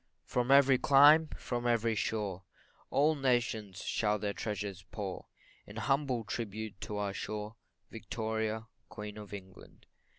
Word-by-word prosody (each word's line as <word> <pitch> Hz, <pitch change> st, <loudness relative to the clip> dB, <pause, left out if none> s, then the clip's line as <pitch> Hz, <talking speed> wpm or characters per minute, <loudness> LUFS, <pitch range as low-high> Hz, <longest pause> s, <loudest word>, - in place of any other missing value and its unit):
From 125 Hz, 0 st, -1 dB
every 135 Hz, -2 st, +6 dB
clime, 150 Hz, +3 st, +7 dB
from 120 Hz, -1 st, -3 dB
every 115 Hz, -1 st, +2 dB
shore, 105 Hz, -3 st, -2 dB, 0.5 s
All 150 Hz, +3 st, +3 dB
nations 120 Hz, -8 st, 0 dB
shall 105 Hz, -1 st, +1 dB
their 100 Hz, 0 st, -2 dB
treasures 100 Hz, -4 st, -4 dB
pour, 100 Hz, -4 st, -5 dB, 0.4 s
In 100 Hz, -, -11 dB
humble 135 Hz, -1 st, 0 dB
tribute 105 Hz, -1 st, -5 dB
to 105 Hz, -, -4 dB
our 100 Hz, -1 st, -2 dB
shore, 105 Hz, +2 st, -5 dB, 0.4 s
Victoria, 110 Hz, -1 st, -3 dB, 0.2 s
Queen 105 Hz, -1 st, -7 dB
of 105 Hz, -1 st, -10 dB
England. 95 Hz, -2 st, -11 dB
110 Hz, 130 wpm, -32 LUFS, 105-125 Hz, 0.5 s, clime